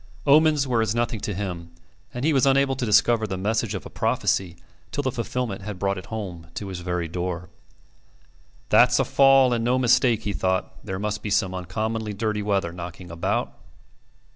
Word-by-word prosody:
Omens 150 -1 +4
were 120 -3 +2
as 110 0 0
nothing 120 -1 -1
to 105 - -3
him, 90 -4 -5 0.4
and 125 +3 -4
he 160 - +3
was 135 -1 +3
unable 135 0 +3
to 125 -2 -3
discover 110 +1 +3
the 95 -2 -4
message 110 +2 -1
of 95 - -6
a - - -8
prophecy 90 -3 0 0.4
till 145 - -2
the 130 - 0
fulfilment 120 -3 -3
had 105 0 -6
brought 100 0 -1
it - - -12
home 90 -7 -6
to 100 - -5
his 95 -2 -5
very 90 -1 -2
door. 90 +1 -4 1.2
"That's - - +5
a - - +2
fall, 135 -2 +5
and 115 -1 0
no 125 +2 +2
mistake," 125 -2 +3
he 100 - -2
thought. 95 -1 -2
"There 95 - -4
must 105 +1 -3
be 105 - -4
some 95 -2 +1
uncommonly 110 +4 -3
dirty 105 0 -2
weather 100 -4 0
knocking 90 0 -8
about." 85 0 -2
105 Hz, 190 wpm, -24 LUFS, 95-120 Hz, 1.2 s, That's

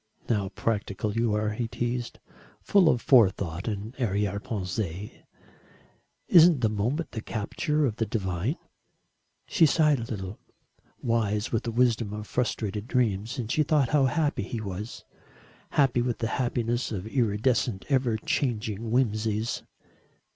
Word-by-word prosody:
"How 105 -4 0
practical 105 -1 -2
you 115 -1 +1
are!" 105 0 0
he 115 +2 -2
teased, 120 +1 -3 0.4
"full 190 -5 +4
of 120 - +1
forethought 95 - +3
and 105 +1 -4
arrière 100 -4 0
pensées. 100 -3 -4 1.2
Isn't 170 -5 +7
the 110 - +3
moment 120 +10 -1
the 110 - -5
capture 145 +8 -1
of 115 -5 -2
the 110 - -1
divine?" 95 - -1 0.9
She 170 -6 +4
sighed 150 -2 +3
a - - -3
little 100 -3 -6 0.6
wise 110 -2 0
with 115 - -1
the 115 - -1
wisdom 115 -3 +1
of 105 0 -5
frustrated 110 -3 -2
dreams, 115 -1 0
and 115 -3 -3
she 155 - +2
thought 150 -4 +2
how 145 -3 +4
happy 145 +3 0
he 115 - -4
was 105 +2 -6 0.6
happy 135 -4 +3
with 120 -1 -1
the 115 - -2
happiness 120 0 -1
of 100 -3 -4
iridescent, 115 -2 0
ever 130 -5 +2
changing 110 -2 -2
whimsies. 110 -2 0
115 Hz, 140 wpm, -27 LUFS, 105-125 Hz, 1.2 s, Isn't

